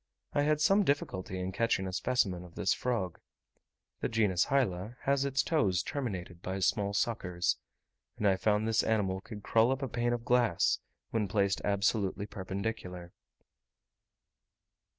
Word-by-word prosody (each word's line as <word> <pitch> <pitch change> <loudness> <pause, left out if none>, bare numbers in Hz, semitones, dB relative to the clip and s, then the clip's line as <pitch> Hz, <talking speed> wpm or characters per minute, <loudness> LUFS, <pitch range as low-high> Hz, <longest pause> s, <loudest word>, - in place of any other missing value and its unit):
I 145 - +2
had 150 +1 +2
some 195 +6 +4
difficulty 95 - -1
in 90 +1 -2
catching 100 -2 +1
a 95 - -4
specimen 95 -3 0
of 85 -2 -14
this 95 - +2
frog. 110 -9 -2 0.8
The - - -1
genus 105 -6 +2
Hyla 115 -4 0
has 140 0 +2
its 135 -1 +1
toes 95 - +2
terminated 95 - -4
by 95 +1 -3
small 100 +1 +1
suckers; 90 -7 0 0.6
and 105 - +1
I 95 - +4
found 105 +2 +1
this 115 0 +3
animal 95 -4 0
could 105 0 -9
crawl 115 +2 +4
up 135 +1 -1
a - - 0
pane 120 0 0
of 120 -1 -4
glass, 120 -8 +3 0.3
when 110 -3 0
placed 100 -1 +1
absolutely 100 -1 +1
perpendicular. 95 -3 -5
105 Hz, 150 wpm, -31 LUFS, 95-120 Hz, 0.8 s, some